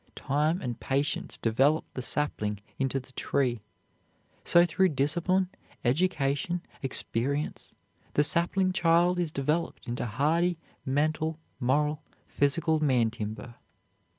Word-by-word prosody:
Time 150 +5 0
and 120 -1 -4
patience 140 +2 -1
develop 135 +8 +2
the 130 - -4
sapling 105 -7 -2 0.2
into 135 0 0
the 130 0 -15
tree. 125 -4 0 0.8
So 170 0 +5
through 190 +1 +2
discipline, 170 +6 +1 0.4
education, 145 +3 +1 0.2
experience, 135 +2 -1 0.4
the 145 - +5
sapling 185 +4 +1
child 175 0 +3
is 175 -2 0
developed 150 +3 -2
into 120 +1 -2
hardy 160 +9 +1 0.3
mental, 155 +3 0 0.2
moral, 150 +4 +1 0.2
physical 155 +3 +1
man 125 -7 +2
timber. 110 +1 -6
145 Hz, 110 wpm, -28 LUFS, 130-170 Hz, 0.8 s, So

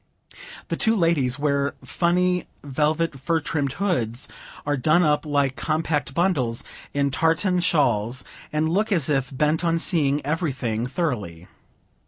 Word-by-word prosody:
The - - 0
two 225 0 +3
ladies 160 - +2
wear 140 -1 0
funny 180 0 +1 0.2
velvet 150 +2 0
fur 165 +5 +1
trimmed 145 -3 -2
hoods; 130 - -1 0.4
are 145 0 +1
done 155 +6 +3
up, 150 0 +1
like 140 -2 +1
compact 155 -1 -1
bundles, 145 -11 +1 0.3
in 140 -1 0
tartan 165 +5 +2
shawls; 130 -8 +2 0.3
and 155 +1 +1
look 205 +7 0
as 165 -8 +2
if 135 -3 +1
bent 150 +5 +1
on 165 -1 +2
seeing 150 -4 +1
everything 130 -7 -1
thoroughly. 110 - -3
150 Hz, 135 wpm, -24 LUFS, 135-165 Hz, 0.4 s, two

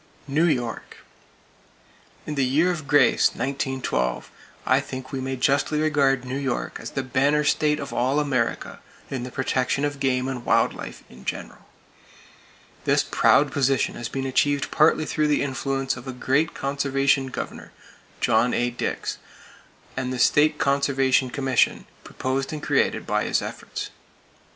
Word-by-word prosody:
New 150 +4 +2
York: 125 -8 -2 1.3
In 150 - -4
the 140 -2 +1
year 150 +8 +3
of 155 -5 -5
grace, 145 - +4
1912, 130 - -2 0.3
I - - +4
think 130 0 -7
we 135 - -3
may 130 0 -3
justly 140 +4 +1
regard 140 -4 +2
New 130 +2 -3
York 135 -3 -3
as - - -6
the 135 - -3
banner 140 +4 +2
state 150 0 +2
of 140 - -6
all 130 +4 +1
America 130 -6 -1 0.3
in 130 -3 -3
the 125 - -5
protection 130 +2 0
of 145 -1 -3
game 130 -1 +1
and 130 -2 -4
wild - - +3
life - - -9
in 65 +1 -15
general. - - -6 1.2
This - - +3
proud 145 0 +3
position 135 -1 +1
has 120 - -5
been 135 0 -3
achieved 140 +2 +1
partly 155 0 +3
through 155 0 0
the 150 -1 +2
influence 135 -1 -2
of 125 +1 -10
a 130 - -4
great 135 +5 0
conservation 140 0 +1
Governor, 130 - -7 0.5
John 115 +1 +3
A. 120 0 0
Dix, 120 - -3 0.8
and 130 -1 -2
the 130 - -3
State 150 +4 +4
Conservation 135 -2 +2
Commission 135 0 +1 0.2
proposed 135 +1 -3
and 155 -1 -6
created - - +1
by - - 0
his - - +1
efforts. - - -6
135 Hz, 150 wpm, -24 LUFS, 130-145 Hz, 1.3 s, grace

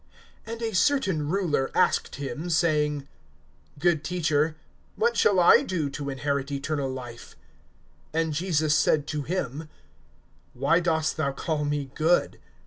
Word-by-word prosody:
(18)And 230 +1 -6
a 225 -1 -2
certain 185 - +1
ruler 165 -7 0
asked - - +2
him, 145 +4 -5
saying: 150 -4 +1 0.7
Good 165 0 +1
Teacher, 155 -3 0 0.4
what 470 +2 +1
shall 195 -3 +3
I 175 - +7
do 160 -7 -2
to 140 0 -5
inherit 140 0 -2
eternal 140 0 -2
life? 125 -3 -8 0.8
(19)And 165 -1 +1
Jesus 155 -1 +1
said 150 -1 +2
to 150 0 -3
him: 155 -2 -4 0.9
Why 140 +7 +3
dost 160 -3 0
thou 145 -3 0
call 150 +1 -2
me 145 -2 -2
good? 165 +3 +1
155 Hz, 135 wpm, -26 LUFS, 140-175 Hz, 0.9 s, I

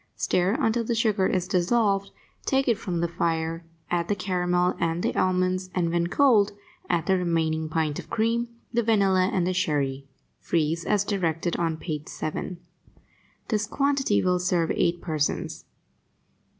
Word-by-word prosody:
Stir 185 +4 +1
until 230 +1 +1
the 230 +1 -1
sugar 215 -4 +2
is 180 -1 0
dissolved, 195 +2 +1 0.4
take 270 0 +2
it 230 -3 +2
from 175 -6 -2
the 170 - +1
fire, 165 0 -1 0.3
add 170 -1 0
the 205 - +1
caramel 180 -1 +1
and 165 +1 0
the - - 0
almonds, 185 0 +1
and, 170 -2 +1
when 170 0 +1
cold, 215 -2 +4 0.4
add 170 -2 +1
the 190 -1 +2
remaining 160 -2 0
pint 155 -2 -1
of - - -10
cream, 230 +2 0 0.2
the 235 - +3
vanilla 195 -4 +3
and 180 -2 +1
the 185 - 0
sherry. 140 -6 -1 0.3
Freeze 165 0 0
as 205 -2 +2
directed 175 -5 -1
on 165 -2 -1
page 155 -2 -5
7. 155 +3 -4 0.9
This 210 -2 0
quantity 275 -3 +1
will 180 -1 +2
serve 175 -2 +1
eight 170 0 0
persons. 155 -3 -2
180 Hz, 155 wpm, -26 LUFS, 165-205 Hz, 0.9 s, cold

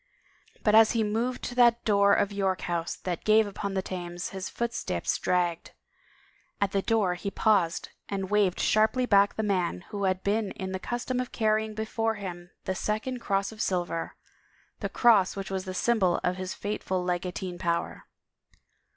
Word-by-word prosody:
But 210 - +3
as 220 +1 +7
he 230 -2 +2
moved 230 +4 -1
to - - -4
that 240 -1 +4
door 200 -2 +4
of 200 0 +3
York 195 -2 0
House 170 -1 -2
that 175 -3 -4
gave 215 +1 +5
upon 200 -1 -4
the 190 - 0
Thames 175 -2 -5
his 190 0 -5
footsteps 235 0 -2
dragged. 175 -2 0 0.9
At 200 -1 +1
the 195 - +1
door 210 -4 +1
he 180 +3 -4
paused 195 -5 +1 0.2
and 195 -1 -3
waved 205 -3 +2
sharply 220 +4 +3
back 200 -3 +4
the 220 - -1
man 180 - 0
who 200 -1 -2
had 185 0 0
been 205 0 0
in 190 0 -5
the 190 - -3
custom 245 +4 -3
of 250 - -3
carrying 215 -1 0
before 225 +1 -1
him 175 -3 -7
the 190 - -1
second 215 +6 -2
cross 195 -3 -1
of 215 - -7
silver, 175 -3 -2 0.6
the - - -3
cross 215 -6 +4
which 195 -1 -5
was 190 0 -2
the 185 0 -5
symbol 195 -5 +2
of 180 - +1
his 185 0 -4
fateful 190 -3 -2
legatine 180 0 -3
power. 170 -1 -2
200 Hz, 175 wpm, -28 LUFS, 185-220 Hz, 0.9 s, as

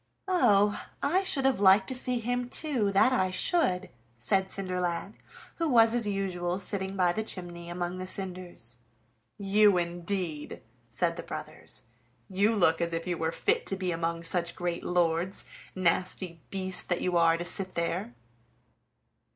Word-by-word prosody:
"Oh! 210 - +3 0.2
I 350 +7 +2
should 285 -8 +1
have 265 -6 +2
liked 195 0 +5
to - - -3
see 250 -1 +1
him 245 +1 -2
too, 255 -9 +1
that 200 +6 +4
I 185 -3 +2
should," 185 - +1 0.3
said 190 +11 0
Cinderlad, 180 0 -3 0.4
who 330 -2 0
was 230 -3 +5
as 240 -3 +3
usual 185 -3 -2
sitting 195 0 -1
by 180 -2 +3
the 220 - -2
chimney 175 -5 -7
among 175 +1 -4
the 185 - -5
cinders. 180 -11 -4 0.6
"You, 200 0 +4
indeed!" 175 -2 -3 0.3
said 170 +7 -1
the - - -4
brothers, - - -5 0.4
"you 200 +3 +1
look 165 -4 +3
as 170 0 -1
if 165 0 -3
you 180 -1 -1
were 160 0 -1
fit 450 - 0
to 195 - 0
be 185 -2 -2
among 165 0 -2
such 170 0 -2
great 175 -1 -3
lords, 175 +1 +1 0.3
nasty 180 -1 -1
beast 190 -2 0
that 175 - 0
you 180 -1 -1
are 165 -1 +4
to 175 - -5
sit 185 +1 +2
there!" 170 -7 -2
185 Hz, 160 wpm, -28 LUFS, 175-205 Hz, 0.6 s, liked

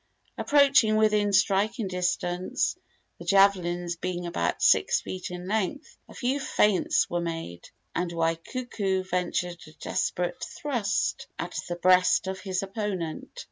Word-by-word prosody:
Approaching 280 -7 +4
within 210 -1 +3
striking 200 +3 +2
distance 180 0 -1 0.4
the - - -8
javelins 175 -3 +3
being 175 0 -3
about 90 - -1
six - - +4
feet 185 0 -6
in 180 0 -7
length 220 - -2
a - - -13
few 265 +3 0
feints 210 -7 +2
were 175 0 -2
made, 165 - -5 0.2
and 180 -1 -1
Waikuku 190 +4 -1
ventured 180 -1 -2
a 155 - -14
desperate 175 +2 -2
thrust 240 -8 -2
at - - -5
the 175 - -2
breast 180 +1 +4
of 190 0 -4
his 190 0 -2
opponent. 195 -5 -4
185 Hz, 130 wpm, -27 LUFS, 175-210 Hz, 0.4 s, Approaching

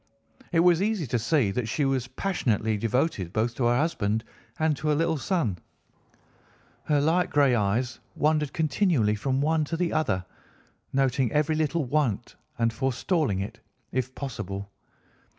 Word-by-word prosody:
It 165 - +4
was 175 0 +5
easy 205 -5 0
to 120 -1 -1
see 115 -2 +2
that 115 +2 -2
she 140 +5 0
was 130 -3 0
passionately 120 - 0
devoted 115 - 0
both 110 +3 0
to 120 0 -1
her 120 +1 +3
husband 110 -8 0 0.3
and 155 -1 +2
to 155 - -4
her 150 - +3
little 165 0 +1
son. 135 - -1 1.3
Her 150 -2 +2
light 165 +5 +2
grey 140 -3 +4
eyes 115 +3 0 0.2
wandered 150 -2 +1
continually 155 - +2
from 130 +5 -1
one 155 +1 +2
to 165 +3 -3
the 175 -1 0
other, 95 -13 0 0.7
noting 135 -3 +1
every 150 +1 +2
little 155 0 0
want 130 -5 -1 0.2
and 115 -1 +1
forestalling 135 - 0
it 100 - -6 0.3
if 130 0 -2
possible. 100 -7 -5
135 Hz, 150 wpm, -27 LUFS, 115-155 Hz, 1.3 s, was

